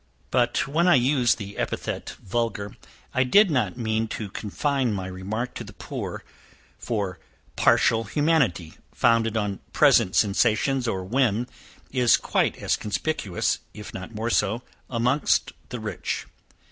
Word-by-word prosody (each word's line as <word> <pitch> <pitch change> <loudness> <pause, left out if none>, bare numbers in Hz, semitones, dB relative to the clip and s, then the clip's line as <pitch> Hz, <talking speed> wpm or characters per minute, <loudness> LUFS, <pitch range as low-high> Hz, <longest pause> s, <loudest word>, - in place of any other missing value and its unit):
But, 120 -1 +2
when 165 +6 +2
I 180 - +7
used 125 0 +3
the 100 -2 -8
epithet - - -3
vulgar, 105 -1 -2 0.4
I 130 - +3
did 195 +9 +5
not 120 -8 0
mean 110 -1 0
to 105 -2 -5
confine 130 +4 -1
my 95 -1 -4
remark 100 +6 -4
to - - -6
the - - -11
poor, - - -6 0.6
for 100 -6 -3 0.4
partial 115 0 +3
humanity, 120 - +1 0.2
founded 115 -1 +2
on 105 -2 -2
present 90 - +4
sensations 115 +5 +2
or 95 -4 -1
whim, 120 +2 +1 0.5
is 125 -3 +4
quite - - 0
as - - 0
conspicuous, 105 - -1 0.2
if 105 -1 -9
not 95 +4 -8
more 115 +2 -2
so, 110 +4 +1 0.3
amongst 125 +4 +1 0.2
the - - -5
rich. - - -4
115 Hz, 135 wpm, -25 LUFS, 100-130 Hz, 0.6 s, I